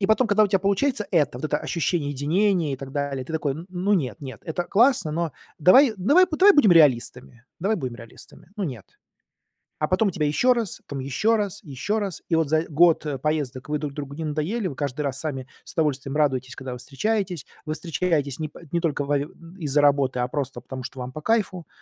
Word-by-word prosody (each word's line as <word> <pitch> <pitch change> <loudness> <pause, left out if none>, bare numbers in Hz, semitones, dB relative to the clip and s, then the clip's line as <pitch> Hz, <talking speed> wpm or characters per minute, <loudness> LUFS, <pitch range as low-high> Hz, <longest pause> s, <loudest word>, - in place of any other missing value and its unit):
И 195 - +2
потом, 220 +3 +3
когда 215 0 +4
у - - +3
тя 195 -1 +3
получается 210 +4 0
это, 145 -8 +1
вот 155 - -7
это 150 -1 0
ощущение 165 -3 -1
единения 165 +3 +1
и - - -3
так 135 0 -9
далее, 140 -3 -2
ты 160 - -8
такой: 155 -3 0
"Н 160 +5 -8
ну, 185 +3 -1
нет 160 -5 0
нет, 130 -5 -8
это 175 +2 -2
классно, 225 - +3
но 165 -1 -1 0.3
давай 230 - +6
давай 290 - +5
б - - -25
давай 405 +2 +8
будем 215 -11 +6
реалистами 125 -5 +2 0.2
давай 210 +4 +1
будем 130 -7 -4
реалистами, 115 +8 -14
ну, 205 - -2
нет". 125 - -6 1.0
А 150 - +1
потом 190 +4 +2
тебя 155 -3 -1
ещё 250 +12 +3
раз, 230 -6 -3
там 140 -1 -5
ещё 140 - +1
раз, 205 -1 -3
ещё 175 - -2
раз, 195 -5 -4
и 165 - +2
вот 160 -2 +2
за, 155 0 +3
э, - - -8
год 160 +1 +4 0.2
поездок 145 -3 -2
вы 150 - 0
друг 145 -2 -4
другу 140 -1 -6
не 160 - -5
надоели, 160 +8 -2
вы 140 - -6
каждый 140 +1 -3
раз 140 -2 -2
сами 135 -4 -4 0.2
с - - -9
удовольствием 145 -5 -1
радуетесь, 130 -4 0
когда 130 -1 -7
вы - - -6
встречаетесь. 180 - -2 0.2
Вы 155 - -2
встречаетесь 160 -3 -1
не 155 - -2
по - - -14
не 170 - +1
только 150 -4 0
во 145 0 +1
из-за 155 0 -3
работы, 140 -3 +3
а 125 - +1
просто 130 -3 -3
потому, 130 -1 -7
что 130 +1 -8
вам 125 0 -5
по 155 - -7
кайфу. 190 -4 0
155 Hz, 225 wpm, -24 LUFS, 140-190 Hz, 1.0 s, давай